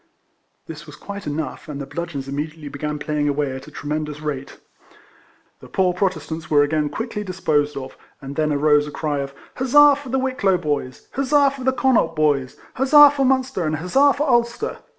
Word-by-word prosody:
This - - -10
was - - -11
quite 200 -4 -8
enough, 150 0 -4
and 145 -1 -5
the 140 - -5
bludgeons 145 -2 -5
immediately 150 +2 -5
began 150 +2 -4
playing 150 0 -1
away 145 -1 -1
at 135 - -9
a - - -9
tremendous 150 0 -4
rate. 145 -3 -5 1.0
The - - -13
poor 185 -2 +1
Protestants 175 -3 -3
were 145 -1 +5
again 150 0 0
quickly 220 - -4
disposed 150 -6 -1
of, 130 -1 -7 0.2
and 140 +1 -8
then 155 0 0
arose 150 0 +3
a - - -7
cry 145 -1 -2
of 140 0 -5 0.2
Huzza 285 +3 +6
for 285 -2 -10
the 265 - 0
Wicklow 255 -8 +1
boys, 145 -6 -4
Huzza 275 +1 +3
for 270 -1 -8
the 260 - +3
Con 260 0 +1
naught 165 -8 +2
boys, 145 -4 0 0.2
Huzza 290 +2 +7
for 280 -2 0
Munster, 260 -7 0
and 155 - 0
Huzza 265 - +3
for 295 +2 -1
Ulster! 235 -2 0
155 Hz, 190 wpm, -21 LUFS, -, 1.0 s, Huzza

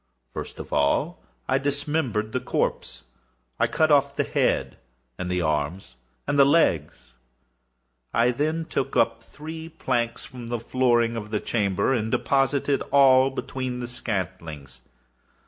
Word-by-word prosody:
First - - -6
of - - -8
all 70 0 +1 0.3
I 130 - +2
dismembered 140 -6 -1
the 130 - -1
corpse. - - -2 0.6
I - - +3
cut 155 -1 +2
off 140 -1 +3
the - - +1
head - - 0 0.4
and 90 -1 -3
the 90 0 0
arms 75 0 -2 0.3
and 145 0 +1
the - - +9
legs. 85 - +1 0.9
I 120 +2 +3
then 155 +5 -1
took 135 -3 -2
up 115 0 +2
three 160 +2 -8
planks 120 -6 -2
from 125 -3 -9
the 120 0 -2
flooring 120 -1 +2
of 105 -2 -5
the 105 -1 -1
chamber, 100 +1 0
and 110 -3 -1
deposited 140 +1 +1
all 135 -1 +6
between 130 -2 -4
the 120 - -4
scantlings. 90 - -5
125 Hz, 140 wpm, -25 LUFS, 105-140 Hz, 0.9 s, the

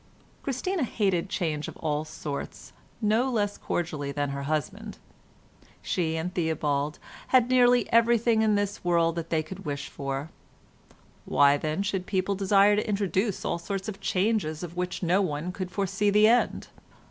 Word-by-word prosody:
Christina 315 +7 -2
hated 195 -7 0
change 155 -6 -2
of - - -9
all 150 -1 -2
sorts 150 -2 -7 0.3
no 220 +5 +2
less 205 -4 -1
cordially 155 -5 -3
than 145 0 -2
her 140 0 -4
husband. 200 +8 -3 0.9
She 160 -3 -1
and 170 +3 -3
Theobald 150 -3 -1 0.3
had 255 -2 +4
nearly 245 -1 +5
everything 230 -1 +4
in 215 -1 +3
this 205 0 -2
world 170 -1 +2
that 165 -1 -4
they 160 -1 +1
could 190 +5 -9
wish 140 -1 -4
for; 140 +3 -4 0.9
why, 140 0 +5
then, 155 +6 -2
should 190 -2 -2
people 190 0 0
desire 200 +1 +4
to 210 - -1
introduce 200 0 0
all - - -1
sorts 195 +3 -4
of 200 -2 -6
changes 185 -6 0
of 175 0 -7
which 180 +1 -3
no 180 +3 +3
one 165 -1 -2
could 185 0 -5
foresee 200 +2 0
the 210 +1 +5
end? 240 +2 +2
185 Hz, 160 wpm, -27 LUFS, 155-210 Hz, 0.9 s, nearly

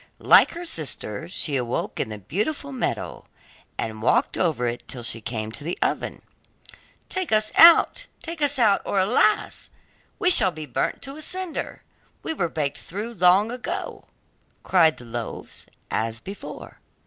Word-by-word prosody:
Like - - +6
her 345 +1 -7
sister 155 - -4
she 150 -5 -1
awoke 125 -1 -3
in - - -2
the 105 - -6
beautiful 215 - -3
meadow, 260 -3 -3 0.5
and 110 -1 -4
walked 125 +3 +2
over 155 -9 0
it 120 0 -4
till 125 -2 -7
she 115 0 -2
came 110 -1 -4
to 140 - -8
the 170 +4 -3
oven. - - -2 0.8
'Take 375 -2 -4
us 215 0 +3
out, 340 +9 +7 0.2
take 335 -1 -6
us 290 -1 +5
out, 215 -5 +3
or - - -2
alas! 210 +2 +2 0.5
we 360 - +3
shall 210 - +7
be 155 -3 -8
burnt - - -2
to 275 +2 -7
a - - -9
cinder; 365 +1 -4 0.4
we - - -2
were 175 - -1
baked 150 -3 -3
through 210 +6 -6
long 190 +3 +4
ago,' 245 0 -5 0.6
cried 165 -4 +3
the 120 - -12
loaves 115 -1 -7 0.2
as 110 0 -2
before. 195 - -10
180 Hz, 160 wpm, -24 LUFS, -, 0.8 s, out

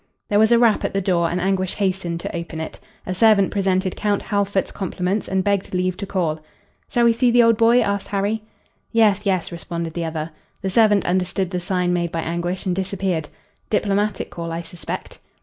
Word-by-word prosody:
There 205 - +3
was 220 +1 +4
a 235 - +7
rap 230 -2 +3
at - - -2
the - - +3
door 175 -3 +1
and 175 - -1
Anguish 185 0 0
hastened 185 -4 -1
to - - -5
open 170 -1 -5
it. 160 - -6 0.3
A 185 - -2
servant 205 -1 +4
presented 190 -1 0
Count 205 -1 0
Halfort's 200 -1 0
compliments 190 +1 -2
and 190 0 0
begged 200 -2 0
leave 185 0 0
to 200 - -5
call. 165 -5 -1 0.5
"Shall 240 -1 +2
we 230 - +5
see 245 +2 +2
the 240 0 +5
old 230 0 +5
boy?" 230 +2 +5
asked 200 -2 -1
Harry. 205 +2 -1 0.5
"Yes, 210 -3 +3
yes," 185 -3 0
responded 170 -1 -5
the 170 0 -2
other. 160 0 -4 0.3
The 190 - -1
servant 210 -1 +4
understood 185 +1 0
the 180 - -1
sign 180 0 0
made 170 -1 -1
by 165 - -2
Anguish 175 +3 -3
and 180 -2 0
disappeared. 185 -4 -2 0.4
"Diplomatic 205 -1 0
call, 170 -1 -5
I 165 +1 -3
suspect." 170 +1 -7
190 Hz, 200 wpm, -21 LUFS, 175-205 Hz, 0.5 s, a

